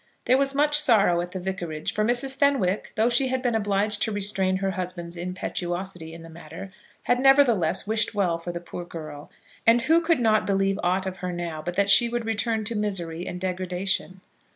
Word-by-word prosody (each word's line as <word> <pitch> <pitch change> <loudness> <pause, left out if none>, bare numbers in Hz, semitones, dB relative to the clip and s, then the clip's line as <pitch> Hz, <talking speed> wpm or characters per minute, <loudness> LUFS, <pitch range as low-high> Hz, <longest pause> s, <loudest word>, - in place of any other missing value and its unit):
There 255 - +4
was 275 0 +1
much 295 +1 +4
sorrow 205 -11 +3
at 175 0 -6
the 185 - -5
vicarage; 175 -4 -4
for 215 - 0
Mrs. 245 +4 +2
Fenwick, 265 -10 +1
though 220 0 +2
she 245 +2 +2
had 260 0 -2
been 245 -2 +1
obliged 205 -1 0
to 220 - 0
restrain 195 -2 +1
her 195 0 -1
husband's 180 -2 -5
impetuosity 175 -1 -5
in 165 0 -11
the - - -11
matter, 165 +4 -10 0.3
had 245 - +1
nevertheless 255 - +3
wished 220 +1 -1
well 175 -5 0
for 175 +1 -6
the 170 - -5
poor 175 0 -8
girl; 155 -4 -9 0.4
and 230 +1 +5
who 325 +5 +4
could 330 -3 +1
not 220 -3 +2
believe 195 0 +1
aught 185 +2 0
of 190 0 -5
her 180 0 -4
now 170 -3 -5
but 175 +2 -5
that 200 +1 +2
she 235 +4 +6
would 240 -1 -3
return 225 0 -1
to 225 +2 -4
misery 180 -5 -3
and 180 - -5
degradation? 185 0 -3
195 Hz, 200 wpm, -25 LUFS, 175-230 Hz, 0.4 s, she